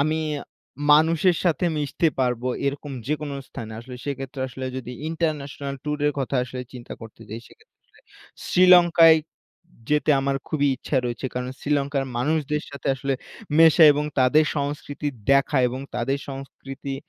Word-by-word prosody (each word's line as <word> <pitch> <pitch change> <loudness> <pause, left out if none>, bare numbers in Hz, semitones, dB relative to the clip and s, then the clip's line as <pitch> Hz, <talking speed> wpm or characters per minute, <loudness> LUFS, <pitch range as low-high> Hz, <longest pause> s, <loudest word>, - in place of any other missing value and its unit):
আমি 155 +2 +1 0.7
মানুষের 165 +3 +4
সাথে 175 +1 +1
মিশতে 150 +3 +1
পারবো 125 0 0 0.2
এরকম 140 +1 -3
যেকোন 150 0 -2 0.2
স্থানে; 110 -1 -8
আসলে 125 +1 -10
সেক্ষেত্রে 135 -1 -5
আসলে 130 +1 -7
যদি 125 -1 -6 0.2
ইন্টারন্যাশনাল 145 -4 -3
ট্যুরের 150 0 0
কথা 135 0 -1
আসলে 130 0 -7
চিন্তা 125 -1 -9
করতে 115 0 -12
চাই; 115 +2 -6
সেক্ষেত্রে - - -23 0.7
শ্রীলঙ্কায় 175 -3 +7 0.7
যেতে 150 +1 +2
আমার 135 0 0
খুবই 145 -3 +1
ইচ্ছা 135 - -3
রয়েছে, 120 +2 -3
কারণ 125 0 -3
শ্রীলঙ্কার 140 -1 0
মানুষদের 150 +3 0
সাথে 140 -1 -5
আসলে 135 +1 -2 0.4
মেশা 165 0 +7
এবং 145 +1 -1 0.2
তাদের 150 +5 +5
সংস্কৃতি 145 +1 -3 0.2
দেখা 140 0 +3
এবং 130 +2 -5
তাদের 130 +3 -1
সংস্কৃতি 135 0 -7
140 Hz, 135 wpm, -24 LUFS, 130-150 Hz, 0.7 s, শ্রীলঙ্কায়